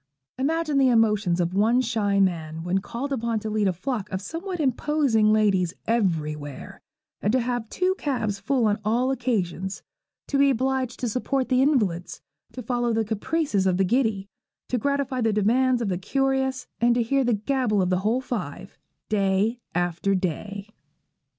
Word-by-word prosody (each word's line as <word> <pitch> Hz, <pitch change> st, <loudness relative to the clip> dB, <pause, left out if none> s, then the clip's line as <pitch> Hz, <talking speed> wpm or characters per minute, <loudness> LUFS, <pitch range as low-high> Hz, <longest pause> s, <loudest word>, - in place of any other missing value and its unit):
Imagine 305 Hz, +1 st, +1 dB
the 265 Hz, -1 st, +5 dB
emotions 210 Hz, -6 st, +2 dB
of 175 Hz, 0 st, 0 dB
one 220 Hz, +5 st, +3 dB
shy 215 Hz, -5 st, +1 dB
man 165 Hz, -4 st, 0 dB
when 180 Hz, +2 st, +1 dB
called 240 Hz, +8 st, -4 dB
upon 230 Hz, -3 st, -1 dB
to 215 Hz, -, -4 dB
lead 210 Hz, -1 st, +1 dB
a -, -, +3 dB
flock 210 Hz, -, -4 dB
of 185 Hz, -, -3 dB
somewhat 340 Hz, -, -5 dB
imposing 265 Hz, -5 st, +2 dB
ladies 195 Hz, -5 st, +2 dB
everywhere; 155 Hz, -, -2 dB, 0.5 s
to 260 Hz, -, +3 dB
have 240 Hz, -2 st, -2 dB
two 370 Hz, 0 st, +1 dB
cabs 225 Hz, -8 st, -1 dB
full 240 Hz, +4 st, +1 dB
on 210 Hz, -1 st, +1 dB
all 240 Hz, +5 st, +1 dB
occasions; 200 Hz, -7 st, -2 dB, 0.4 s
to 280 Hz, -, -1 dB
be 280 Hz, 0 st, +5 dB
obliged 260 Hz, -1 st, -1 dB
to 245 Hz, -, 0 dB
support 255 Hz, +3 st, -1 dB
the 255 Hz, -1 st, +3 dB
invalids 210 Hz, -, +1 dB, 0.3 s
to 250 Hz, -, -8 dB
follow 240 Hz, 0 st, 0 dB
the 225 Hz, 0 st, +1 dB
caprices 215 Hz, -, 0 dB
of 180 Hz, -1 st, +2 dB
the 195 Hz, -, +3 dB
giddy, 220 Hz, -3 st, 0 dB, 0.4 s
to 250 Hz, -, 0 dB
gratify 280 Hz, -1 st, -1 dB
the 225 Hz, -1 st, +2 dB
demands 240 Hz, +4 st, +2 dB
of -, -, -2 dB
the 180 Hz, -2 st, -1 dB
curious, 265 Hz, +3 st, 0 dB
and 235 Hz, 0 st, +3 dB
to 240 Hz, -, +2 dB
hear 275 Hz, +4 st, +1 dB
the 240 Hz, -1 st, +2 dB
gabble 220 Hz, -1 st, 0 dB
of 185 Hz, -1 st, +1 dB
the 180 Hz, -, +2 dB
whole 220 Hz, +6 st, +1 dB
five 195 Hz, -, -6 dB, 0.3 s
day 205 Hz, +3 st, +1 dB, 0.2 s
after 175 Hz, +3 st, 0 dB
day. 195 Hz, +3 st, -3 dB
225 Hz, 170 wpm, -25 LUFS, 195-260 Hz, 0.5 s, the